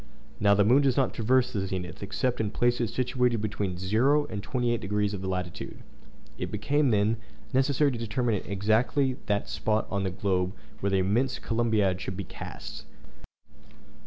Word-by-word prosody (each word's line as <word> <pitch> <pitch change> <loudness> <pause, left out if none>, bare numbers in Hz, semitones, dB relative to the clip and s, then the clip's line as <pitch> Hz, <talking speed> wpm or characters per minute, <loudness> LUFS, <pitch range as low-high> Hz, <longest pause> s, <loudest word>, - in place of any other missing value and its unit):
Now 100 -1 +5
the 100 - +4
moon 125 +6 +6
does 135 -3 +2
not 135 -2 +2
traverse 125 +2 +2
the 95 -3 -1
zenith, 90 -2 -5
except 110 +5 -1
in 105 - -1
places 120 +1 +1
situated 125 -1 +1
between 100 -3 -2
0° 115 +11 +2
and 100 - -3
28° 105 -4 0
of 95 -1 -5
latitude. 90 -2 -4 0.6
It - - -2
became, 145 -1 +1
then, 105 +1 +2 0.4
necessary 140 +2 +3
to 120 - -4
determine 115 -2 0
exactly 115 +7 +1
that 100 -1 0
spot 110 0 0
on 100 -1 0
the 95 - 0
globe 90 0 0 0.3
where 100 - 0
the 95 - +2
immense 110 +8 +1
Columbiad 110 -5 +1
should 95 -1 -5
be 100 - -3
cast. - - -8
110 Hz, 160 wpm, -28 LUFS, 100-125 Hz, 0.6 s, moon